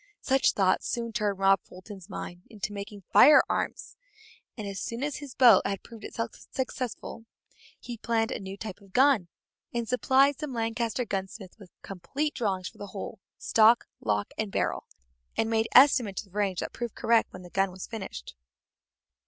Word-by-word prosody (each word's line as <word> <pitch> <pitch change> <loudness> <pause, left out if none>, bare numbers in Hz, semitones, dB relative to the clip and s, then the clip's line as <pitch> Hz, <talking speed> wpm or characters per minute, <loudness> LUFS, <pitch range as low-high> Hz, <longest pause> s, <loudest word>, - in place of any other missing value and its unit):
Such 270 0 +3
thoughts 190 -2 +1
soon 230 -1 -3
turned 210 -3 0
Rob 195 0 +4
Fulton's 190 0 -12
mind 175 0 -7 0.2
to 210 - -2
making 200 0 -8
firearms, 300 +1 +4 0.6
and 215 -3 -5
as 195 -1 -5
soon 235 +3 -4
as 290 -1 -2
his 285 -4 -9
boat 240 -7 +7
had 195 -1 -3
proved 230 -2 -13
itself 230 0 -4 0.2
successful, 255 -3 -4 0.5
he 240 -1 -7
planned 225 -1 0
a - - -3
new 195 0 -7
type 205 -3 -7
of 195 -1 -19
gun, 260 -8 +4 0.4
and 235 -1 -3
supplied 265 +3 +3
some 300 -4 -5
Lancaster 230 +1 -1
gunsmiths 195 0 -6
with 195 -3 -14
complete 280 - -3
drawings 190 -5 -2
for - - -13
the 205 - -6
whole, 195 0 -7 0.2
stock, 225 +2 +4
lock, 105 -1 -1
and 215 -2 -2
barrel, - - -1 0.5
and 225 0 +1
made 225 0 +2
estimates 245 -7 +5
of 190 - -25
range 200 -3 -1
that - - -5
proved 240 -2 -5
correct 230 0 +2
when 185 - -10
the 175 - -12
gun 195 0 +1
was 185 0 -8
finished. 195 - -8
215 Hz, 170 wpm, -28 LUFS, 195-240 Hz, 0.6 s, boat